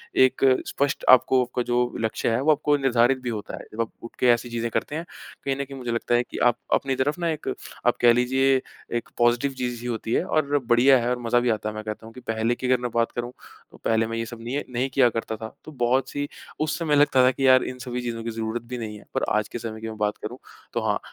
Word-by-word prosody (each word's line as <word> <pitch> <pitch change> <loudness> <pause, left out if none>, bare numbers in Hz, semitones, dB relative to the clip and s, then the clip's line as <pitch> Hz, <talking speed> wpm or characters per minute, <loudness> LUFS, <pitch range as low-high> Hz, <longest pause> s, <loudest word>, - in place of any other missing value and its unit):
एक 130 +1 +4 0.2
स्पष्ट 140 0 -1
आपको 130 0 +6
आपका 125 0 -3
जो 120 0 0
लक्ष्य 110 +1 -1
है, 115 +3 +1
वो 155 +3 +4
आपको 150 0 +2
निर्धारित 130 -1 +3
भी 125 - -3
होता 105 -3 -5
है। - - -9
जब 115 - -1
आप 115 - -3
उठके 115 +2 -1
ऐसी 120 +1 0
चीज़ें 120 0 -2
करते 145 - -2
हैं। 165 +2 -4 0.4
कहीं 135 -1 +1
न 140 - -2
कहीं 135 0 -9
मुझे 125 -2 -4
लगता 115 +1 0
है 120 - +3
कि - - -9
आप 120 -1 +4 0.2
अपनी 135 -1 +1
तरफ़ 145 +6 0
ना 170 -1 0
एक 155 -2 -4 0.4
आप - - +3
कह 120 -1 +7
लीजिए, 130 +2 +2 0.4
एक 120 - -6
पॉज़िटिव 120 +3 +3
चीज़ 120 -1 -3
ही 120 - -5
होती 115 -1 -3
है - - +2
और 145 -2 +1
बढ़िया 125 +3 +6
है 120 - 0
और 125 0 -1
मज़ा 120 +1 +2
भी 120 0 0
आता 110 -1 -1
है। 105 - -7
मैं 110 - -5
कहता 110 +1 -6
हूँ 115 - -11
कि 125 - -10
पहले 115 +1 0
की 130 - -4
अगर 125 -1 +3
मैं 125 -1 -3
बात 115 0 +2
करूँ, 120 0 -4 0.4
तो - - -15
पहले 115 0 +2
मैं 115 0 -4
यह 115 - -2
सब 115 0 -9
नी 120 +4 -3
नहीं 125 +2 -1
किया 130 -3 +5
करता 115 -1 -3
था, 110 0 -8
तो 155 - -9
बहुत 130 -1 +1
सी 145 0 -3 0.3
उस 155 +1 0
समय 155 -3 +1
लगता 145 -3 +5
था 130 - +5
कि 135 +1 0
यार 130 0 +6
इन 125 - -5
सभी 125 0 -4
चीज़ों 115 -2 -4
की 115 - -3
ज़रूरत 110 +1 -3
भी 125 - -3
नहीं 110 -3 -5
है। - - -15
पर - - -1
आज 105 -1 0
के 120 - -6
समय 110 -1 -6
की 110 - -5
मैं 110 - -8
बात 105 0 0
करूँ, 120 +4 -5 0.4
तो - - 0
हाँ - - +1
120 Hz, 275 wpm, -25 LUFS, 115-130 Hz, 0.4 s, कह